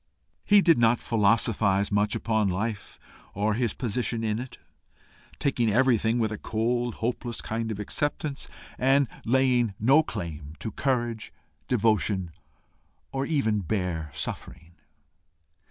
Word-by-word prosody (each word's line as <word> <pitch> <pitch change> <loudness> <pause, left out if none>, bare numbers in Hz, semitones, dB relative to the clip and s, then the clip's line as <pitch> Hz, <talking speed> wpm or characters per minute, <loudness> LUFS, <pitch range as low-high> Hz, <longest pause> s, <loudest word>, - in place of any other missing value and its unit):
He 205 0 +6
did 165 -7 +5
not 115 0 +4
philosophize 105 -2 +2
much 105 +1 +1
upon 110 -2 +1
life 100 +3 -3 0.4
or 105 +2 +1
his 120 0 -1
position 120 -1 -2
in 110 0 0
it, 125 0 -8 0.8
taking 120 -5 +1
everything 115 0 +3
with 110 -2 0
a 110 - -5
cold, 120 +2 -1
hopeless 120 0 -3
kind 115 0 -3
of 105 -2 -4
acceptance, 145 +6 -2 0.3
and 135 +1 +4 0.2
laying 125 -4 +2
no 135 +8 +5
claim 80 - -6
to 110 +8 -5
courage, 120 -3 -1 0.4
devotion, 105 -6 +1 0.8
or 135 0 -2
even 135 -10 +1
bare 90 -4 -2
suffering. 80 +4 -7
115 Hz, 120 wpm, -27 LUFS, 105-125 Hz, 0.8 s, He